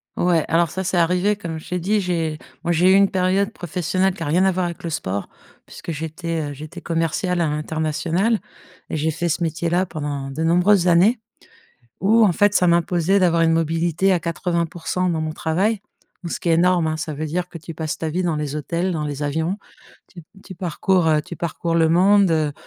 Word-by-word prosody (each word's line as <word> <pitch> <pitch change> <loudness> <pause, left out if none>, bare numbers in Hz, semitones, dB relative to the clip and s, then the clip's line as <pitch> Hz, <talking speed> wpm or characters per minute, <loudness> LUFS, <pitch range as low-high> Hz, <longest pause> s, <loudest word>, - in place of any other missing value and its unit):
Ouais, 175 -3 +2
alors 165 0 +2
ça, 190 - -3
c'est 185 -1 -1
arrivé 180 +5 +2
comme 165 -5 -6
je 155 - -13
t'ai 180 0 -1
dit, 205 +4 +1
j'ai 165 -4 -2 0.2
moi, 175 - 0
j'ai 180 +3 +4
eu - - +6
une 200 0 +5
période 190 +2 +1
professionnelle 180 +2 -1
qui 165 - -6
a - - -4
rien 170 +6 +2
à 190 - +4
voir 185 0 -1
avec 170 -1 -6
le 170 - -3
sport. 100 - -3 0.4
Puisque 170 - -8
j'étais, 160 0 -4
heu, - - -6
j'étais 155 +5 -9
commerciale 165 +2 -1
à 160 - +2
l'international 160 +7 -1 0.5
et - - -3
j'ai 160 +2 0
fait 170 +2 -2
ce 165 +3 -1
métier-là 170 +3 0
pendant 145 -4 -5
de 155 +4 -5
nombreuses 180 +2 +3
années 190 +8 +4 0.8
où, 220 +3 +5
en 190 - +4
fait, 205 +3 +3
ça 180 - +4
m'imposait 170 +2 +2
d'avoir 170 -3 +3
une 165 - +3
mobilité 165 +3 +1
à 180 - +2
80% 170 +1 -2
dans 160 -2 -1
mon 155 0 -2
travail, 195 +8 0 0.4
donc 170 - -5
ce - - -3
qui 170 - -2
est - - +5
énorme, 175 -1 +3
hein. 155 0 -2
Ça 155 -1 -4
veut 155 +2 -4
dire 175 +4 -2
que 170 - -9
tu 165 +1 -9
passes 155 -1 -3
ta 160 - -3
vie 180 +4 -1
dans 170 -3 0
les 150 -1 -3
hôtels, 170 +5 -2
dans 155 -3 -2
les 145 -1 -5
avions. 160 +6 -1 0.5
Tu 170 -3 -12 0.2
tu 185 - -10
parcours, 180 0 0
heu 155 -1 +3
tu 170 - -9
parcours 170 0 -2
le 165 -1 +3
monde, 175 -4 +3
170 Hz, 215 wpm, -21 LUFS, 160-185 Hz, 0.8 s, eu